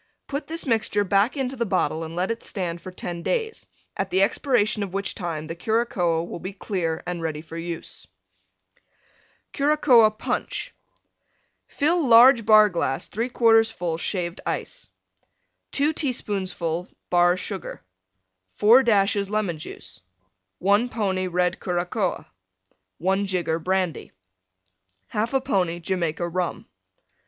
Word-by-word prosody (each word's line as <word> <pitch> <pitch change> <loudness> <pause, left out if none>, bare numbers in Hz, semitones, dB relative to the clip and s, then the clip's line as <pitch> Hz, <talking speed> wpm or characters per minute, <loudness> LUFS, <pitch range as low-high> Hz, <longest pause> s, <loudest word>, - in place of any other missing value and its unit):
Put 280 +1 -5
this 330 +1 -4
mixture 220 -4 +1
back 200 +8 +2
into 265 -1 -2
the 235 - -1
bottle 165 -4 0
and 160 +1 -7
let 185 +4 0
it 230 - -4
stand 175 -4 -4
for 185 - -8
10 175 -1 -6
days, 450 - -2 0.3
at - - -2
the 190 +1 +3
expiration 215 -1 +1
of 195 -2 -4
which 200 0 -1
time 165 -4 -4
the 165 - -5
Curacoa 180 -4 0
will - - -7
be 185 +4 -6
clear 180 -5 -3
and 175 -1 -4
ready 155 -2 -3
for 160 +1 -11
use. 165 0 -6 1.5
CURACOA 275 -6 +5
PUNCH - - -3 0.9
Fill 330 +4 +1
large 235 -1 +7
Bar 215 -1 +7
glass 170 -7 -2
3/4 225 -1 +3
full 170 -5 -3
Shaved 175 -1 -3
Ice. - - -4 0.8
2 290 +3 +2
teaspoonfuls 190 - -2 0.2
Bar 175 0 +4
Sugar. 190 0 -6 0.7
4 230 +5 +6
dashes 200 -4 +2
Lemon 200 -6 -1
Juice. - - -9 0.6
1 205 +6 +2
pony 190 -5 -1
Red 180 0 0
Curacoa. 180 +2 -2 0.7
1 190 +3 0
jigger 175 -3 -1
Brandy. 185 0 -1 1.0
1/2 240 +5 0
pony 180 -3 0
Jamaica 170 -1 -2
Rum. 180 0 -3
195 Hz, 130 wpm, -24 LUFS, 175-230 Hz, 1.5 s, large